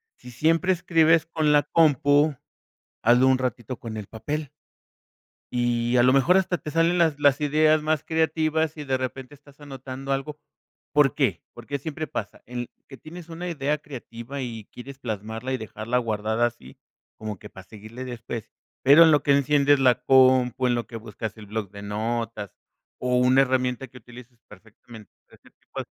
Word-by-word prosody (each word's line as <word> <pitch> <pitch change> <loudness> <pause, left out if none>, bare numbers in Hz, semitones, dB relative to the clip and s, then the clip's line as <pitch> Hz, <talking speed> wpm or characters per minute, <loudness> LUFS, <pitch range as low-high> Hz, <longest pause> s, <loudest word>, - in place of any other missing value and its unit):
si 125 - -13
siempre 165 +8 +2
escribes 165 -2 +3
con 155 -2 0
la 145 0 +4
compu, 145 -1 +3 0.7
hazlo 125 +3 +5
un 130 -1 +3
ratito 125 -1 -4
con 110 -2 -7
el 105 -2 -6
papel. 145 +6 -5 1.0
Y 120 0 +1
a 120 - +5
lo 130 +1 +5
mejor 170 +8 +4
hasta 175 -3 0
te 150 - -7
salen 165 +3 +2
las 160 -4 +2
las 145 0 +3
ideas 155 +1 +3
más 155 -1 0
creativas, 160 0 0
y 150 - -5
de 135 -2 0
repente 130 +1 -6
estás 145 0 -19
anotando 135 -1 -7
algo, 140 +2 -3 0.6
¿por 145 -4 +4
qué? - - 0
Porque 140 0 -6
siempre 155 +1 -5
pasa 105 -4 -6
en 120 0 -5 0.2
que 135 - -12
tienes 170 +3 -11
una 175 +2 -5
idea 150 -1 -1
creativa, 130 -1 -8
y 115 -4 -6
quieres 135 +2 -11
plasmarla, 110 +2 -5
y 130 - 0
dejarla 110 +2 -3
guardada 110 0 0
así 70 - -7 0.4
como 110 -3 -6
que - - -11
para 95 - -13
seguirle 110 +4 -10
después. 115 -3 -7 0.3
Pero, 145 +5 +8
en 160 - +6
lo 150 - +3
que 140 - +2
enciendes 145 0 +3
la 125 -2 +5
compu, 130 -1 +4
en 120 - +2
lo 120 -2 -3
que 115 - -7
buscas 110 0 -7
el 105 - -12
block 105 -2 -4
de 100 -1 -10
notas, 110 0 -3 0.5
o, 125 0 0
una 125 +2 +4
herramienta 130 0 0
que 125 - -15
utilices 120 0 -15
perfectamente 110 +2 -15
de - - - 0.4
ese - - -77
tipo - - -6
130 Hz, 180 wpm, -24 LUFS, 115-150 Hz, 1.0 s, Pero